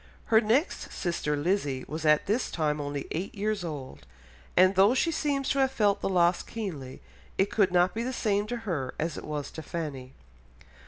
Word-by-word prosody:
Her 220 - +8
next 240 - 0
sister 170 -4 -1
Lizzy 145 -5 0
was 155 +1 -3
at 150 0 +4
this 220 +6 0
time 150 -2 -1
only 145 -1 -4
eight 180 +7 -3
years 210 -1 -1
old, 145 -6 -7 0.5
and 185 +1 +6
though 200 +6 +5
she 330 +6 +2
seems 280 -3 -1
to 275 - +1
have 265 -1 +4
felt 210 -6 +2
the - - 0
loss 175 -1 +3
keenly, 155 - -6 0.4
it 195 +1 +2
could 200 -4 +3
not 180 +1 +3
be 225 - -2
the 250 +2 -2
same 210 -4 0
to 240 - -3
her 155 -10 -2
as 160 -1 -2
it - - -7
was 150 -2 -4
to 160 - -7
Fanny. 145 -6 -5
180 Hz, 195 wpm, -28 LUFS, 150-215 Hz, 0.5 s, Her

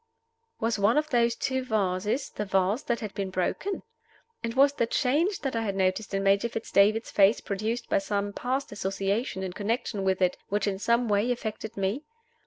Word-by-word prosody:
Was 225 -2 0
one 205 +7 +4
of 305 0 0
those 235 -1 +3
two 260 +1 -1
vases 210 +2 -1
the 210 - -3
vase 195 +4 +1
that 235 -5 -2
had 215 -3 -5
been 195 -1 -3
broken? 190 - -2 0.6
And 230 0 -3
was 280 +1 +5
the 235 -5 0
change 300 - +1
that 270 -4 -2
I 230 - 0
had 200 -3 -2
noticed 190 +2 0
in 195 - 0
Major 200 +4 +3
Fitz 225 -1 -6
David's 215 +3 +3
face 200 +2 +5
produced 215 +4 -3
by - - +2
some 200 0 -2
past 260 +5 -2
association 195 +1 -2
in 185 -1 -4
connection 210 0 -2
with 190 -1 +1
it, 180 -1 +2
which 205 0 0
in 195 -2 -1
some 235 +3 +2
way 210 +3 +2
affected 220 -2 -4
me? 195 +7 -1
215 Hz, 195 wpm, -27 LUFS, 195-235 Hz, 0.6 s, was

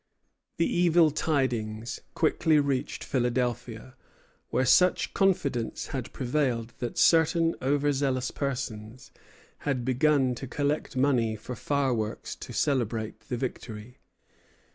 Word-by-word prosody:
The 170 - +2
evil 170 -2 +4
tidings 120 -7 -1 0.2
quickly 160 -1 +3
reached 140 -3 -1
Philadelphia, 125 -1 -2 0.5
where 130 - +1
such 180 +9 +4
confidence 160 -12 0
had 130 -3 -4
prevailed 125 -3 -1
that 120 -1 -4
certain 165 0 +4
over 145 +2 +2
zealous 130 -2 0
persons 125 -3 -5 0.5
had 130 -4 -2
begun 130 0 +2
to 130 +2 -7
collect 145 +1 -2
money 125 -5 +2
for 110 +4 -7
fireworks 130 -7 -1
to - - -9
celebrate 115 -6 -1
the 125 - -1
victory. 120 -2 -6
130 Hz, 110 wpm, -28 LUFS, 120-145 Hz, 0.5 s, evil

